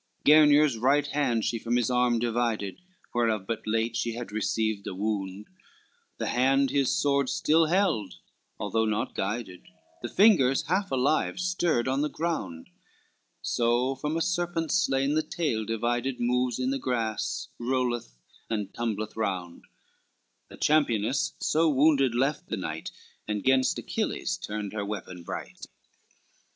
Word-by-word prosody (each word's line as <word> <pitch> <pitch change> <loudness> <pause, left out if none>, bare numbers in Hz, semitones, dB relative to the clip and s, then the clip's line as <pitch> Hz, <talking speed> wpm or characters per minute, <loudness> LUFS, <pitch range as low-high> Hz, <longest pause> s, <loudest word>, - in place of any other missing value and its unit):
LXIX - - -3
Gernier's 150 -3 +6
right 140 +4 +3
hand 130 -6 0
she 115 - -1
from 120 +2 -1
his 120 0 +1
arm 125 -1 +2
divided, 115 - -1 0.3
Whereof 115 -4 +1
but 110 +1 -4
late 115 +1 0
she 115 0 -1
had 120 -1 -6
received 110 -1 -1
a - - -4
wound; 100 -1 -3 0.7
The - - -2
hand 135 +1 +2
his 140 -2 +2
sword 140 -2 +1
still 160 +1 +3
held, 165 - +1 0.4
although 110 +2 0
not 110 +1 -1
guided, 95 -2 -4 0.3
The 120 - -4
fingers 175 - +4
half 190 +5 0
alive 135 +7 +1
stirred 175 -8 0
on 135 +2 +1
the 150 - 0
ground; 155 - -4 0.7
So 120 +2 +1
from 150 +4 -3
a 165 - +1
serpent 175 -2 -1
slain 140 -5 +2
the 155 - +2
tail 150 -8 -2
divided 120 +3 -1
Moves 125 0 +1
in 130 +1 -1
the 135 - -1
grass, 115 -4 -2
rolleth 120 - -1 0.3
and 105 -3 -3
tumbleth 110 -2 -3
round, 95 -6 -3 0.8
The - - -12
championess 135 -4 +1
so 160 +1 +2
wounded 135 -3 +3
left 135 +4 0
the 110 - -2
knight, 80 -4 -5 0.4
And 105 -1 -2
gainst 130 0 +3
Achilles 210 -4 -2
turned 105 - -5
her 105 -1 -2
weapon 100 -3 -6
bright. 85 - -7
120 Hz, 145 wpm, -27 LUFS, 110-145 Hz, 0.8 s, Gernier's